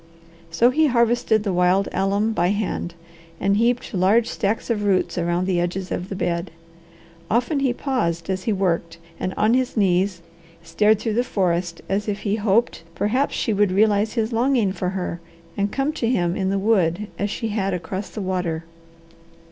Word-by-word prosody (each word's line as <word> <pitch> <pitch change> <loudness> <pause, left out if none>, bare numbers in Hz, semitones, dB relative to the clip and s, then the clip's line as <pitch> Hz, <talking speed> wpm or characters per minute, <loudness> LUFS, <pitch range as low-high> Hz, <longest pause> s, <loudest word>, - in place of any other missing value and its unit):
So 230 +9 +3
he 310 +3 +3
harvested 235 -3 +2
the 200 -3 -1
wild 180 +2 +3
alum 200 +4 0
by 175 -4 +1
hand, 195 -3 -2 0.4
and 200 +1 +2
heaped 240 +2 0
large 200 +5 +3
stacks 220 +3 -1
of 210 -2 -1
roots 195 -2 +1
around 175 +1 0
the 185 -2 +1
edges 180 +2 -3
of 180 +2 -3
the 195 - -4
bed. 170 -1 -2 0.8
Often 245 +6 +1
he 270 -2 +2
paused 170 - -2
as 185 -1 -3
he 225 - +1
worked 170 -4 -1 0.2
and 185 - -2
on 215 +2 +3
his 255 -1 0
knees 185 -2 +1 0.4
stared 210 +6 +3
through 220 +1 -2
the 240 +3 +2
forest 175 -6 -1
as 205 +2 -1
if 205 -1 -2
he 205 0 0
hoped 215 +1 +1
perhaps 250 +10 0
she 225 - 0
would 205 -1 +2
realize 210 +2 +2
his 225 0 -1
longing 235 -3 +2
for 180 -1 -2
her, 180 -2 -4 0.3
and 200 0 -1
come 275 +3 -1
to 230 -6 -1
him 175 -7 +1
in 190 -2 -1
the 195 - 0
wood 195 -2 +1
as 205 - 0
she 225 +2 -3
had 200 -2 -1
across 185 +3 -5
the 215 - -6
water. 180 -4 -2
200 Hz, 180 wpm, -22 LUFS, 180-225 Hz, 0.8 s, So